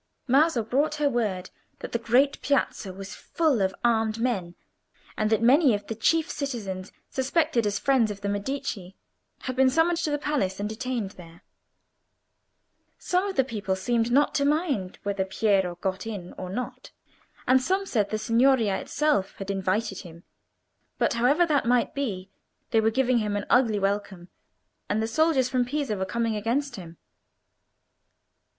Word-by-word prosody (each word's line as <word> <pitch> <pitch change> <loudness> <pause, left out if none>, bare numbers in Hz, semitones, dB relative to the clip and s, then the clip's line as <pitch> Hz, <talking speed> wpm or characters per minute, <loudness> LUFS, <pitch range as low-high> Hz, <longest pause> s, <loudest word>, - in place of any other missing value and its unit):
Maso 270 -1 +3
brought 280 +7 0
her 300 -1 +1
word 200 -7 -2 0.3
that - - -8
the 235 - -1
great 250 +5 +2
Piazza 260 -7 0
was 195 +1 -8
full 310 -10 0
of 190 0 0
armed 225 -2 +2
men, 195 -8 -1 0.6
and 215 - 0
that 220 +1 +2
many 265 0 +5
of 205 0 -6
the 225 - -4
chief 320 +9 +2
citizens 205 - -5 0.2
suspected 270 -3 +1
as 200 -1 -1
friends 255 -2 +2
of 200 -1 -6
the 200 - -3
Medici 200 -3 -4 0.5
had 255 - -4
been 260 0 +4
summoned 330 +5 +2
to 320 - -1
the 290 - 0
palace 235 -11 -1
and 205 - -1
detained 225 -2 -3
there. 170 -3 -15 1.5
Some 365 +2 0
of 390 - -4
the 265 - +4
people 205 -6 -3
seemed 230 +4 0
not 285 +4 +3
to 280 - +1
mind 285 - 0
whether 200 -1 -1
Piero 190 -2 +1
got 190 +3 -3
in 195 -5 -6
or 185 - -7
not, 250 +5 -5 0.6
and 260 0 +5
some 380 +8 0
said 210 - 0
the 215 - -1
Signoria 230 -2 +3
itself 295 -11 0
had 195 0 -5
invited 195 +1 -1
him; 170 0 -12 0.7
but - - +1
however 265 +9 +3
that 290 -7 +1
might 245 +3 +2
be, 210 -10 -4 0.4
they 225 - +4
were 220 - +3
giving 255 +1 +2
him 210 -2 -1
an 205 - -2
ugly 235 -4 +4
welcome; 195 -3 -2 0.6
and 210 - +1
the 220 - 0
soldiers 280 +1 +2
from 255 -1 +1
Pisa 275 -2 -2
were 190 -1 -2
coming 230 +3 -1
against 240 +7 -1
him. 170 -3 -10
230 Hz, 165 wpm, -26 LUFS, 200-270 Hz, 1.5 s, many